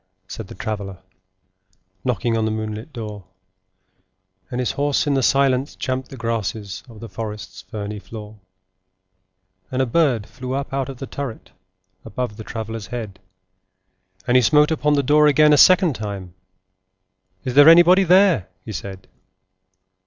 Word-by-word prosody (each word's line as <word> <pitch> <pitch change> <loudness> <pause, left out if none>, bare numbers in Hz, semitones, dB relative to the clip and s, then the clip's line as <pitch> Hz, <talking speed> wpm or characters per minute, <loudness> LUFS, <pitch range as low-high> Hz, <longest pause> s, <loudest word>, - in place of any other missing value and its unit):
said 105 +2 -8
the - - -11
Traveller, 100 -4 -5 1.1
Knocking 120 -2 0
on 110 -1 0
the - - 0
moonlit 110 +4 -5
door; 105 -6 -7 1.3
And 125 - -4
his 125 - 0
horse 145 +1 0
in 145 - +1
the 135 - +1
silence 135 +1 +2
champed 130 -1 -3
the 135 - -10
grasses 110 -3 -3
Of 110 -2 -13
the 115 - -7
forest's 105 -3 -7
ferny 105 +2 -6
floor: 105 0 -10 1.3
And 130 - -3
a 130 - +3
bird 125 -5 +1
flew 130 +3 -7
up 135 0 -4
out 135 0 -2
of 135 - -8
the 135 - -6
turret, 135 -4 -7 0.5
Above 120 0 -4
the 110 - -7
Traveller's 110 -1 -6
head: 110 -6 -6 1.1
And 120 - +1
he 130 - +7
smote 150 +5 +4
upon 150 -1 +1
the 140 - +1
door 150 +3 +4
again 150 +1 +5
a - - +5
second 185 -4 +6
time; 100 -5 -6 1.1
'Is 125 - -2
there 145 +3 +8
anybody 175 +3 +7
there?' 180 - +4 0.2
he 110 - -6
said. 95 -1 -7
120 Hz, 155 wpm, -21 LUFS, 105-140 Hz, 1.3 s, there